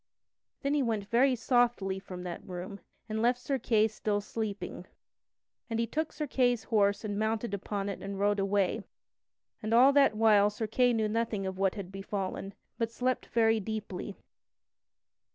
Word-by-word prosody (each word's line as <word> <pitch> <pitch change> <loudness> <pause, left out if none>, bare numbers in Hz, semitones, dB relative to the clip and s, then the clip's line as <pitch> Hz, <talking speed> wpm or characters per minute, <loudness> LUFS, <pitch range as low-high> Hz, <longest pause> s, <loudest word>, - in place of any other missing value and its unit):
Then 280 +1 +1
he 295 - +2
went 220 -5 -1
very 255 +2 +4
softly 235 -5 +1
from 180 -2 -8
that 175 -1 -6
room, 185 +2 -7 0.3
and 220 0 -2
left 240 +2 +3
Sir 270 +1 -2
Kay 220 -2 +3
still 210 -1 -1
sleeping. 205 -4 -5 0.8
And 225 - -1
he 230 - +2
took 310 +7 -2
Sir 300 - -3
Kay's 245 -4 +1
horse 205 -2 +2
and 205 -1 -2
mounted 220 0 -1
upon 200 0 -3
it 200 - -4
and 195 0 -5
rode 205 0 +2
away; 195 +1 +1 0.8
and 220 +1 0
all 260 +4 +7
that 275 -6 +5
while 210 -2 +5
Sir 210 +2 -4
Kay 245 +3 +3
knew 220 -2 +1
not 230 +2 0 0.2
what 190 +1 0
had 195 -3 -6
befallen, 195 0 -4 0.2
but 230 -1 0
slept 255 +2 -1
very 225 -1 +3
deeply. 210 -2 -5
215 Hz, 165 wpm, -30 LUFS, 200-235 Hz, 0.8 s, all